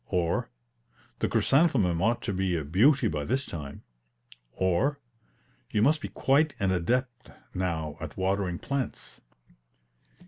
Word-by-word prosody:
or, 85 -7 0 0.7
"The - - 0
chrysanthemum 115 - +3
ought 115 +4 +1
to 100 - -2
be 95 -1 0
a 80 - -2
beauty 115 - +4
by 75 -2 -2
this 130 - -1
time;" 70 -4 -7 0.7
or, 95 +11 +1 0.7
"You 105 - +1
must 155 +5 +3
be - - -5
quite 145 +3 +2
an 95 -2 +1
adept 120 +8 -1 0.2
now 80 -5 -2
at 80 -2 -7
watering 95 -1 0
plants." 140 +1 -4
95 Hz, 130 wpm, -28 LUFS, 85-130 Hz, 0.7 s, beauty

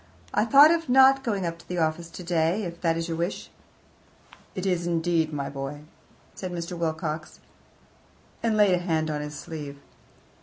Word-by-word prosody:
I 210 - +2
thought 280 +6 +8
of 330 -3 0
not 265 +1 +6
going 205 -7 -1
up 170 0 -4
to - - -17
the 180 - -4
office 165 +1 -1
today, 170 +3 -1
if 170 -2 -7
that 165 -1 +1
is 165 0 -2
your 165 -1 -3
wish." 170 +3 -3 1.0
"It 185 - -4
is, 175 -2 0
indeed, 165 -1 +1
my 140 -2 -3
boy," 140 +1 -6 0.5
said 185 -2 -6
Mr. 170 0 -5
Wilcox, 160 -1 -3 1.0
and 225 -2 +1
laid 205 -3 +5
a 180 - +2
hand 160 -3 -1
on 150 -1 -2
his 150 0 -6
sleeve. 145 -3 -7
170 Hz, 175 wpm, -26 LUFS, 160-185 Hz, 1.0 s, thought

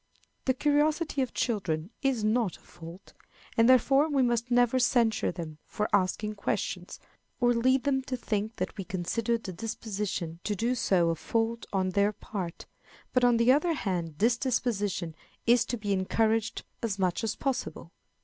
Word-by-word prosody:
The 260 - +2
curiosity 295 +1 +1
of 255 - -1
children 185 -6 -1
is 265 -6 +1
not 215 -3 +1
a - - -25
fault, 170 +3 -12 0.4
and 230 +2 +5
therefore 270 +4 +5
we 275 -3 +2
must 240 0 0
never 245 +1 +3
censure 230 -3 +2
them 160 -3 -7
for 210 - -2
asking 205 +2 +1
questions, 200 - -3 0.4
or 245 -1 +4
lead 255 +3 +2
them 270 -2 +1
to 255 -1 -3
think 215 -2 -2
that - - -3
we 195 - -3
consider 215 +6 -1
the 195 -5 -7
disposition 195 -4 -4
to 210 - -1
do 230 +5 0
so 185 -8 +2
a - - -1
fault 230 +6 -2
on 190 -1 +1
their 200 +2 +2
part; 190 -4 -6 0.5
but, 255 - +3
on 245 -1 +5
the 235 +2 +5
other 305 +5 +3
hand, 175 - -2
this 230 +5 +3
disposition 205 - -1 0.3
is 240 +1 +4
to 240 - -3
be 205 -2 -1
encouraged 220 +3 0 0.2
as 215 -4 -2
much 185 +2 0
as 220 -1 -1
possible. 205 - -3
225 Hz, 170 wpm, -29 LUFS, 195-245 Hz, 0.5 s, and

